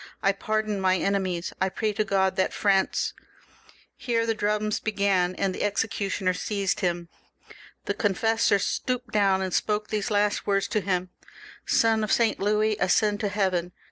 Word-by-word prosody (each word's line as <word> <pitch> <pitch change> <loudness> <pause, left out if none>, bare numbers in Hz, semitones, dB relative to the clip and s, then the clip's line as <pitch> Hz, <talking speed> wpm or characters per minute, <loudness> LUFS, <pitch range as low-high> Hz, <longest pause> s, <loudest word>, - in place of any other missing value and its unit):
I 195 - +4
pardon 215 0 -2
my 185 0 +3
enemies; 185 -3 -1
I 190 - +2
pray 215 +2 -2
to 215 - 0
God 190 -2 +1
that 185 - 0
France 195 -2 +1 0.4
" - - -28
Here 230 -1 +2
the 225 - +1
drums 210 0 -1
began, 200 -4 +1
and 195 -1 -1
the - - -6
executioner 200 -2 -1
seized 200 0 -2
him. 175 -3 -1 0.8
The - - -1
confessor 225 +1 +2
stooped 250 +4 -2
down 195 -2 +3
and 185 -1 -3
spoke 210 0 0
these 215 +1 -2
last 205 -1 +1
words 195 0 +1
to 215 - 0
him: 185 -1 -2 0.3
— - - -16 0.2
"Sonof 220 -2 +2
Saint 230 -2 +2
Louis, 210 +1 +1
ascend 205 +3 +2
to 210 - -1
heaven!" 185 -4 -1
200 Hz, 165 wpm, -26 LUFS, 190-215 Hz, 0.8 s, I